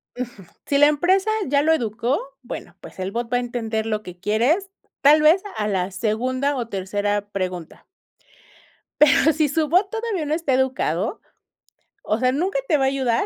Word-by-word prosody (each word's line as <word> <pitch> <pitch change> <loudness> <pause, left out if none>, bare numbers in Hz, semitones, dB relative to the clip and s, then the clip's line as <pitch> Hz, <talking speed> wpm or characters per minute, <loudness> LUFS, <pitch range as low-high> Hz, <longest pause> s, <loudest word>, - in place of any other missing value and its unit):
Ujú. 245 -5 -7 0.2
Si 280 - +1
la 290 +1 +7
empresa 370 +7 +2 0.2
ya 280 +1 +3
lo 320 +2 +3
educó, 235 0 -1 0.2
bueno, 245 - -8
pues - - -12
el 185 +1 -3
bot 235 +2 -4
va 245 - +3
a - - +1
entender 230 -3 -3
lo 215 -1 -1
que 180 -2 -10
quieres, 245 - +1 0.3
tal 300 +2 +6
vez 320 +5 +5
a 210 -1 -1
la 190 -2 -1
segunda 255 +8 -1
o 240 -3 -3
tercera 205 +1 -2
pregunta. 185 -4 -5 1.2
Pero 300 +1 +6
si 310 0 +2
su 305 +2 0
bot 370 +4 +3
todavía 445 -7 -2
no 295 - -1
está 320 -4 0
educado, 255 - -1 0.8
o 215 - 0
sea, 255 0 +2
nunca 375 - 0
te 310 - +3
va 270 - +1
a - - +3
ayudar. 265 -4 +1
255 Hz, 180 wpm, -22 LUFS, 215-305 Hz, 1.2 s, la